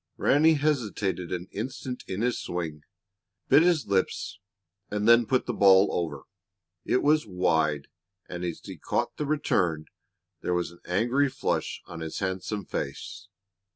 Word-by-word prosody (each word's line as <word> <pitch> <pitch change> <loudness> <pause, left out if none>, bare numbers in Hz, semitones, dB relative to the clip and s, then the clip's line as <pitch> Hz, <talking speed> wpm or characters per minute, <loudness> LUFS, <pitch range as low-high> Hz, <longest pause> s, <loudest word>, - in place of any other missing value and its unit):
Ranny 155 +3 +4
hesitated 110 - -1
an 90 0 -3
instant 125 +3 -5
in 95 +3 -3
his 125 0 0
swing, 80 -4 -4 0.7
bit 145 - +7
his 170 -5 +3
lips, 100 +1 -1 0.5
and 105 +1 -1
then 115 -1 +6
put 130 -1 +1
the 120 - -2
ball 95 -1 +6
over. 75 -6 -3 0.6
It 125 - +1
was 150 -3 +3
wide, 80 -6 +1 0.4
and, 90 0 -6
as 85 -2 -4
he - - -8
caught - - -2
the 150 - -2
return, 90 - +1 0.6
there 90 - 0
was 85 -2 -1
an 85 - -17
angry 120 +10 +2
flush - - -2
on 85 - -9
his 80 -1 -5
handsome 95 +2 -3
face. 90 +7 -5
100 Hz, 150 wpm, -27 LUFS, 85-125 Hz, 0.7 s, bit